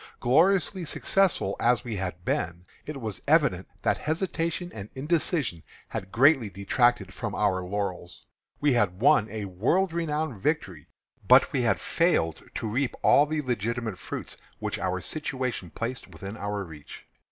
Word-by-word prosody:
Gloriously 180 +7 +3
successful 175 - +1
as 120 0 +3
we 120 -4 -4
had 90 -2 -5
been, 85 +2 -2 0.2
it 150 -2 -5
was 110 -5 -4
evident 140 - +3 0.2
that - - +2
hesitation 170 +1 -2
and 100 -1 -8
indecision 150 - 0 0.3
had 95 0 -5
greatly 135 -2 +4
detracted 100 0 +1
from 115 -1 -4
our 95 -3 +1
laurels. 90 -1 -4 0.3
We 145 -2 +3
had 100 -6 +1
won 110 -2 +4
a 105 -1 -4
world 125 - +1
renowned 155 - -2
victory, 95 - -2 0.4
but - - +6
we - - +2
had - - +2
failed 80 0 +1
to 115 - -2
reap 125 +5 -1
all 145 - +6
the 155 0 -1
legitimate 115 -4 -2
fruits - - -6 0.2
which - - -3
our 95 0 -1
situation 130 - -3
placed 115 +7 -4
within 95 +4 -8
our 105 -2 -3
reach. 75 -5 -11
115 Hz, 150 wpm, -27 LUFS, 95-150 Hz, 0.4 s, but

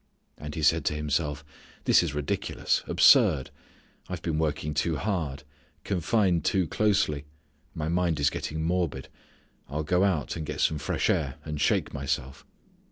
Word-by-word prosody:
And 75 0 -7
he 80 - -3
said 80 +2 +4
to 75 - +1
himself: 75 -1 -2 0.4
"this - - +6
is 80 -5 -3
ridiculous, 75 -1 -1
absurd. 65 -3 +5 0.6
I've 90 -2 -5
been 80 -2 -1
working 75 -1 -1
too 80 +2 0
hard; 75 -6 -2 0.4
confined 95 -1 +1
too 95 -3 +2
closely; 95 -6 +1 0.5
my 75 -1 -3
mind 85 -2 +1
is 70 - +3
getting 80 +1 -4
morbid. 85 -5 -1 0.6
I'll 75 +2 -2
go 90 +5 +2
out, 90 -8 0
and 80 - -4
get - - -5
some 75 - +2
fresh 70 - -1
air, 70 -4 0
and 75 -1 -4
shake - - +1
myself." 70 -1 -3
80 Hz, 155 wpm, -27 LUFS, 75-85 Hz, 0.6 s, this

